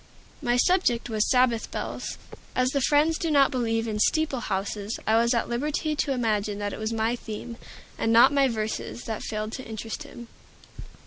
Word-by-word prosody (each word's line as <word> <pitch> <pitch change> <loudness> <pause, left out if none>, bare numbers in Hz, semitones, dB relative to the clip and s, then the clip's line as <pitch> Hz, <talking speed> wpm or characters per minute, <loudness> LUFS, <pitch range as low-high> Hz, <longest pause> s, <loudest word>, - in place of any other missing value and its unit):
My 245 -3 +1
subject 245 -7 +2
was 215 -1 +1
"Sabbath 250 -3 +2
Bells." - - -5 0.4
As 255 0 +2
the 280 - 0
Friends 300 +4 +3
do 330 - -1
not 280 -2 +4
believe 230 -3 0
in 210 -1 -2
"steeple 300 +2 +2
houses," 205 0 -3
I 220 - +3
was 235 +2 +3
at 230 - 0
liberty 300 +5 -1
to 285 - 0
imagine 215 -5 0
that 205 -1 -3
it - - -6
was 220 +1 -2
my 225 +1 0
theme, 230 +1 -7 0.4
and 225 - +1
not 235 +4 +7
my 275 -1 +4
verses, 220 0 -3
that 220 -2 -4
failed 215 0 -4
to 260 - -6
interest 225 +3 -6
him. 240 -5 -10
235 Hz, 185 wpm, -26 LUFS, 220-270 Hz, 0.4 s, not